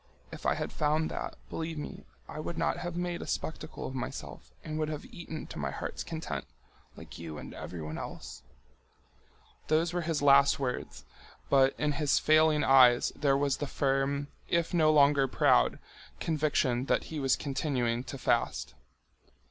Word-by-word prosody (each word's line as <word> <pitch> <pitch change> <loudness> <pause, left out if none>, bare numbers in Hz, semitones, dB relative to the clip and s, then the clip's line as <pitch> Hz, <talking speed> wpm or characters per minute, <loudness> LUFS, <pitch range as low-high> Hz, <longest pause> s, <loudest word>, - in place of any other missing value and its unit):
If - - -8
had - - 0
found 155 +1 +1
that, - - -4 0.2
believe 160 0 -4
me, 150 - -7 0.2
I - - -7
would 165 +2 -5
not 165 - 0
have 175 -1 -5
made 175 0 -2
a - - -7
spectacle 160 0 -4
of - - -5
myself 125 -2 -6
and 155 0 -4
would 155 -1 0
have 150 -2 -5
eaten 160 -2 -8
to - - -8
my 70 -1 -1
heart's - - -5
content, 165 -1 -5 0.5
like - - -11
you 80 -2 -7
and - - -8
everyone 80 -3 -6
else." - - -8 1.3
Those 160 +2 +2
were 175 - 0
his 155 -3 -1
last 140 0 +6
words, 130 -2 -4 0.5
but 135 -1 +5
in 150 0 +1
his 145 0 +1
failing 155 -1 +4
eyes 125 -2 +6
there 140 -2 +2
was 140 -1 +1
the 145 - -3
firm, 140 +1 0 0.2
if 170 +1 0
no 155 -3 +4
longer 140 -2 +5
proud, - - +3 0.4
conviction 150 -5 +1
that - - +1
he 155 - -2
was 135 -2 +3
continuing 130 -4 -1
to 135 - -6
fast. 130 - 0
145 Hz, 165 wpm, -30 LUFS, 135-155 Hz, 1.3 s, last